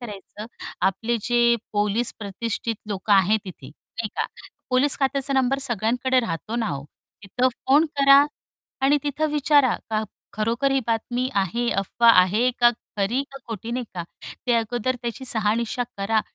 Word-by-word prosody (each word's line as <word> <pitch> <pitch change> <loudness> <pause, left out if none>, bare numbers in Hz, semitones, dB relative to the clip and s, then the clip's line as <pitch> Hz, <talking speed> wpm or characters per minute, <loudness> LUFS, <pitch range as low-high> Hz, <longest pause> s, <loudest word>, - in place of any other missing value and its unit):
करायचं? 210 -2 -9 0.3
आपले 195 +6 0
जे 240 0 +3 0.2
पोलीस 210 +3 +1
प्रतिष्ठित 225 +2 -3
लोक 200 0 -4
आहेत 200 +2 +5
तिथे, 180 -8 -10
नाही 215 +9 -8
का, - - 0 0.4
पोलीस 260 +3 +3
खात्याचा 275 0 0
नंबर 265 0 +2
सगळ्यांकडे 250 +1 +1
राहतो 215 +3 -4
ना 230 - 0
हो, 140 -4 -4 0.4
तिथं 245 +6 +1
फोन 270 +5 +2
करा 275 0 +7 0.6
आणि 290 +2 +4
तिथं 295 +2 -1
विचारा 290 -3 +4 0.2
का 215 0 0 0.3
खरोखर 230 +6 0
ही 270 - +2
बातमी 240 +2 -1
आहे, 220 +5 0
अफवा 195 +4 +2
आहे 215 +7 +2
का 240 0 +7 0.3
खरी 215 +7 0
का 275 - -10
खोटी, 225 +1 -5
नाही 245 0 -2
का? 175 - -3 0.4
ते 245 - +3
अगोदर 240 +2 0
त्याची 235 +2 -5
शहानिशा 225 +2 0
करा. 215 +2 +1
235 Hz, 150 wpm, -23 LUFS, 210-255 Hz, 0.6 s, करा